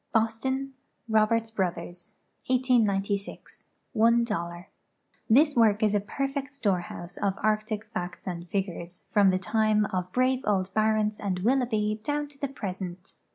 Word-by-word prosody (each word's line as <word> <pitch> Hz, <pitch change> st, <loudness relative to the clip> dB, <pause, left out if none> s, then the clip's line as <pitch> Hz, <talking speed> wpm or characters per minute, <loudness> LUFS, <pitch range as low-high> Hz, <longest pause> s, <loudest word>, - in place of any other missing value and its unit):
Boston: 260 Hz, +5 st, 0 dB, 0.3 s
Roberts 220 Hz, +1 st, +2 dB
Bros. 180 Hz, 0 st, -4 dB, 0.3 s
1890. 225 Hz, -6 st, +2 dB, 0.8 s
$1.00. 215 Hz, -7 st, +1 dB, 0.6 s
Tliis 290 Hz, +6 st, +5 dB
work 220 Hz, -3 st, +4 dB
is 210 Hz, -1 st, +3 dB
a 205 Hz, -, +3 dB
perfect 275 Hz, +6 st, -3 dB
storehouse 180 Hz, -6 st, -2 dB
of 195 Hz, -2 st, 0 dB
arctic 215 Hz, 0 st, 0 dB
facts 210 Hz, -5 st, -6 dB
and 175 Hz, -1 st, -5 dB
figures, 180 Hz, -3 st, -4 dB
from 200 Hz, -2 st, +5 dB
the 185 Hz, -, +2 dB
time 215 Hz, +1 st, +2 dB
of 180 Hz, 0 st, -2 dB
brave 255 Hz, +3 st, +2 dB
old 190 Hz, -2 st, 0 dB
Barents 215 Hz, -1 st, +1 dB
and 190 Hz, -3 st, -1 dB
'Willoughby 220 Hz, -3 st, +1 dB
down 295 Hz, +3 st, -1 dB
to 280 Hz, -1 st, -17 dB
the 280 Hz, -, -1 dB
present. 190 Hz, -7 st, -6 dB
215 Hz, 130 wpm, -27 LUFS, 190-235 Hz, 0.8 s, Tliis